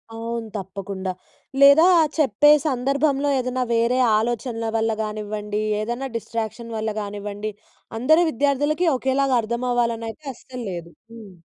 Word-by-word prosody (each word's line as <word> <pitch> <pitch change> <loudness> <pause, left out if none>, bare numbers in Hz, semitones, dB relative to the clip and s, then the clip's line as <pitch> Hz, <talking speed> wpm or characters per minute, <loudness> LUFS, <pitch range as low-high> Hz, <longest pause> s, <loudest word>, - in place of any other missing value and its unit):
అవును. 230 0 -4
తప్పకుండా. 190 0 -5 0.5
లేదా 280 +4 +8 0.3
చెప్పే 295 +1 +4 0.2
సందర్భంలో 275 +2 +1
ఏదన్నా 255 0 -1
వేరే 235 +2 +2 0.2
ఆలోచనల 230 0 -2
వల్ల 225 0 +1
గానివ్వండి, 210 0 -4 0.2
ఏదైనా 240 +5 -3
డిస్ట్రాక్షన్ 230 +1 -5
వల్ల 215 0 -2
గానివ్వండి, 205 +1 -5 0.5
అందరూ 315 +7 +4
విద్యార్థులకి 290 +6 +1
ఒకేలాగా 265 0 +1
అర్థమవ్వాలనైతే 235 +2 -2
అస్సలు 250 +1 -9
లేదు. 170 -1 -7 0.2
హ్మ్. 215 -5 -12
235 Hz, 110 wpm, -22 LUFS, 215-265 Hz, 0.5 s, లేదా